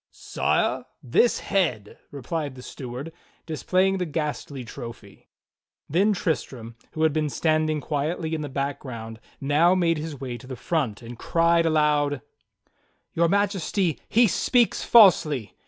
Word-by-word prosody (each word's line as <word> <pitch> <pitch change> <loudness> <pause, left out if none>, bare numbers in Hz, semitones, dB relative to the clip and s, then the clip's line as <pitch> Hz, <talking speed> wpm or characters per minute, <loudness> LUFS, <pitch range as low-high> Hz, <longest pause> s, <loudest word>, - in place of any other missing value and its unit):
"Sire, - - -1 0.2
this 130 - +3
head," 125 - -1
replied 145 +1 -4
the 125 - -11
steward, 130 +6 -7 0.3
displaying 185 +4 +1
the 180 - -2
ghastly 150 -3 -4
trophy. 115 -3 -10 0.6
Then 195 +8 +2
Tristram, 130 - -3 0.2
who 155 - -1
had 160 -2 +3
been 155 -1 0
standing 155 0 +1
quietly 160 +3 -2
in 160 - -2
the 145 - -5
back 140 +1 -3
ground, 115 -4 -8 0.2
now 155 +6 +3
made 165 -3 +1
his 150 -3 -6
way 125 -3 -5
to 130 - -13
the 130 - -6
front, 125 -4 -2
and 115 0 -10
cried 170 0 +2
aloud: 150 -3 +1 0.9
"Your 170 0 +2
Majesty, 195 -3 0
he. 235 +2 +5
speaks 235 +4 +2
falsely! 155 - +5
155 Hz, 140 wpm, -25 LUFS, 130-170 Hz, 0.9 s, he